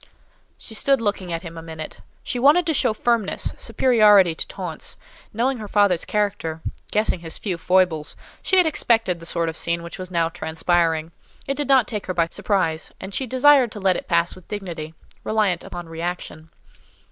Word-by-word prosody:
She 225 - -12
stood 270 +4 +2
looking 200 -5 -2
at 165 +1 -3
him 165 -1 -8
a - - -8
minute. 160 -1 -8 0.2
She 245 - -3
wanted 300 +7 +5
to 320 - +1
show 270 - +2
firmness, 225 -1 0
superiority 210 -8 +4
to - - -3
taunts; 180 -5 -4 0.3
knowing 245 +3 0
her 215 - -6
father's 200 -4 +2
character, 200 -6 -1 0.3
guessing 210 -3 +1
his 165 -1 -6
few 190 -4 -3
foibles, 175 -3 +1 0.3
she 380 - +1
had 365 - +6
expected 225 - +2
the 165 - -7
sort 170 -1 0
of 160 - -3
scene 170 0 -1
which 170 +3 -8
was 185 -1 -6
now 170 -2 +1
transpiring; 165 0 0 0.3
it 275 - -1
did 290 -1 -2
not 265 -4 +4
take 210 -4 -2
her 185 - -3
by 170 -1 +1
surprise, 165 -6 -1
and 195 - -8
she 265 - -1
desired 260 -1 +5
to 210 - -7
let 190 -2 +2
it - - -5
pass 170 0 +2
with 185 - -16
dignity, 170 -6 -6 0.3
reliant 210 -5 +1
upon 175 -1 -8
reaction. 165 -1 -5
185 Hz, 185 wpm, -22 LUFS, 165-220 Hz, 0.3 s, had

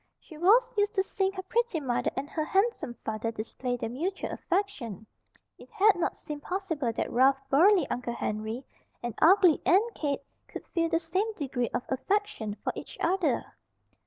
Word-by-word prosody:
She 320 - -14
was 445 +10 +4
used 415 +1 +1
to 385 - +3
seeing 385 0 -1
her 375 -1 -5
pretty 465 -2 0
mother 255 -5 0
and 275 +2 -2
her 310 +1 -2
handsome 385 - 0
father 220 +1 -2
display 245 +3 -4
their 230 - -3
mutual 345 +10 -3
affection; 315 - -2 0.5
it - - -14
had 430 -2 +4
not 350 - -1
seemed 300 -2 -7
possible 325 -9 -2
that 225 - -3
rough, 265 +2 +5
burly 350 +3 +5
Uncle 245 -1 -3
Henry 220 +5 -3 0.4
and 240 -1 -3
ugly 360 -1 +6
Aunt 430 +6 +3
Kate 285 -2 -2 0.2
could - - -8
feel 330 -1 0
the 330 - +2
same 370 +7 -1
degree 255 - -2
of - - -2
affection 265 - -1
for - - -1
each - - -8
other. 365 +1 0
330 Hz, 170 wpm, -29 LUFS, 250-390 Hz, 0.5 s, ugly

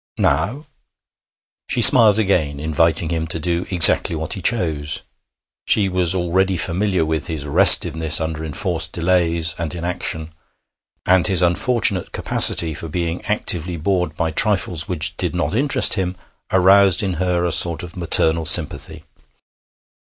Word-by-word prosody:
'Now?' 100 - -2 1.0
She - - -2
smiled 105 -2 +6
again, 85 -9 -2
inviting 80 +1 0
him 80 -1 -4
to 80 - -3
do 85 +2 -4
exactly 85 -2 +5
what 80 0 -4
he 95 - -7
chose. 80 -9 -3 0.6
She 100 -2 +1
was 90 -1 -1
already 95 +1 -2
familiar 95 0 -2
with 80 -1 -5
his 80 -4 -6
restiveness 80 +2 +4
under 80 -1 -6
enforced 80 +1 -3
delays 85 -2 -2
and 85 +1 -5
inaction, 85 -2 -5 0.7
and 95 -1 +1
his 95 -3 +2
unfortunate 95 +2 -1
capacity 80 -2 +3
for 80 - -7
being 85 +1 -6
actively 90 -5 -1
bored 90 -1 -3
by 80 -1 -3
trifles 90 -2 -1
which 80 -4 -3
did 90 -1 -4
not 85 -2 -3
interest 135 +2 +2
him 95 -2 -3 0.4
aroused 95 0 +3
in 95 -2 -3
her 90 -1 -2
a 85 - -2
sort 85 +1 +2
of 85 -1 -11
maternal 80 -2 +2
sympathy. - - +1
85 Hz, 140 wpm, -17 LUFS, 80-95 Hz, 1.0 s, smiled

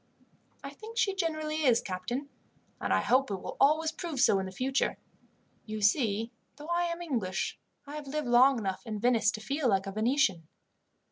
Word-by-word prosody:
"I 275 - -6
think 440 +11 -11
she 450 -4 +2
generally 310 -4 -2
is, 245 -4 +5
captain, 200 +10 -4 0.5
and - - -2
I - - +3
hope 265 0 +2
it 200 - -1
will 185 - -7
always 310 +3 +4
prove 325 -4 -5
so 220 -6 +5
in 190 - -3
the - - -7
future. 265 +7 0 0.7
You 215 0 -4
see, 220 0 +2 0.2
though 295 +3 -10
I 345 0 +1
am 340 0 -3
English, 220 - -2 0.3
I 290 +1 -7
have 295 -2 -8
lived 300 +2 -2
long 250 +2 +6
enough 190 -4 -3
in 215 -1 -3
Venice 230 -1 +3
to 215 -1 -4
feel 270 +4 0
like 195 -1 +2
a 195 - -4
Venetian." 215 - +1
255 Hz, 190 wpm, -30 LUFS, 215-305 Hz, 0.7 s, long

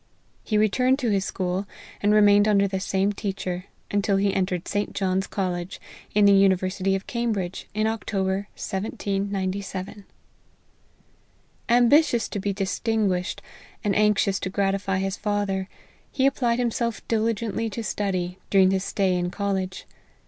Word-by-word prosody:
He 215 - 0
returned 250 +5 +3
to 245 -6 0
his 195 -2 +1
school, 185 +1 -2 0.3
and 205 - +3
remained 205 0 +6
under 200 -1 +4
the 190 0 -2
same 195 +1 0
teacher, 190 -3 -4 0.3
until 205 -1 +2
he 200 0 +1
entered 185 -2 -1
St. 205 0 -2
John's 190 -1 0
college, 180 -2 -3 0.4
in 210 -1 +5
the 200 - +7
university 190 0 +3
of 195 - -4
Cambridge, 220 -7 -2
in 215 0 +1
October, 200 -3 -1
1797. 195 0 -3 1.6
Ambitious 245 +1 +4
to 205 - -3
be 200 +1 -1
distinguished, 195 -1 -1 0.4
and 205 -2 +1
anxious 210 -2 +2
to - - -3
gratify 195 0 0
his 195 +1 -2
father, 200 -2 -1 0.4
he 265 - +1
applied 245 -4 +2
himself 235 -2 -2
diligently 225 0 0
to 225 +2 -5
study 185 -4 -2
during 190 -1 +5
his 190 -1 0
stay 190 -2 +1
in 175 0 -1
college. 190 -1 -3
200 Hz, 135 wpm, -25 LUFS, 190-215 Hz, 1.6 s, the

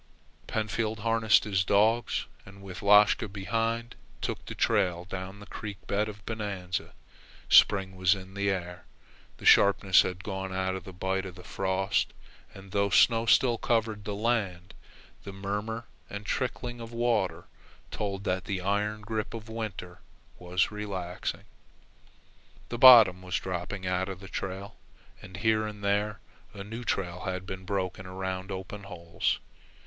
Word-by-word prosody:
Pentfield 110 0 -2
harnessed 115 -1 +4
his 95 -3 +1
dogs, 110 +5 +2 0.2
and 100 +1 -14
with 95 -2 -8
Lashka 105 +2 +5
behind 115 +4 -2 0.3
took - - -3
the - - -6
trail 90 -1 +1
down 95 +1 -6
the 105 - -11
creek 105 -2 -7
bed 105 +2 0
of 105 -1 -11
Bonanza. 100 -5 -4 0.6
Spring 95 -1 +5
was 95 +1 +3
in 95 0 -10
the 100 0 0
air. 90 -2 -4 0.5
The - - -11
sharpness 100 -1 +6
had 90 0 -4
gone 95 -2 -4
out 95 0 -1
of 95 - -6
the 95 - -8
bite 95 +1 -2
of 90 - -9
the 90 - -12
frost 95 +1 0 0.4
and 95 -1 -13
though 100 +1 +1
snow 115 +2 +4
still 120 0 +4
covered 110 -3 0
the 105 0 -4
land, 100 -5 -1 0.5
the 100 - -7
murmur 105 +4 -4 0.2
and 100 +1 -7
trickling 120 -1 -3
of 115 0 -8
water 115 -8 0 0.5
told 100 -2 -3
that 90 -2 -1
the 95 +1 -2
iron 105 +3 -1
grip 110 +1 -3
of 115 0 -8
winter 105 -5 -6 0.4
was 90 +3 0
relaxing. 95 -4 -4 1.3
The 120 - -4
bottom 115 -8 +9
was 90 -1 -4
dropping 95 +1 -4
out 90 +1 0
of 95 -2 -6
the 95 - -10
trail, 95 +3 -5 0.4
and 90 -1 -10
here 110 +1 +2
and 105 -1 -8
there 105 +1 0 0.4
a 100 - -6
new 115 +4 -7
trail 90 -5 -2
had 95 0 -3
been 95 -1 -7
broken 95 -1 -3
around 95 0 -4
open 95 +1 -6
holes. 85 -3 -2
100 Hz, 155 wpm, -29 LUFS, 95-110 Hz, 1.3 s, bottom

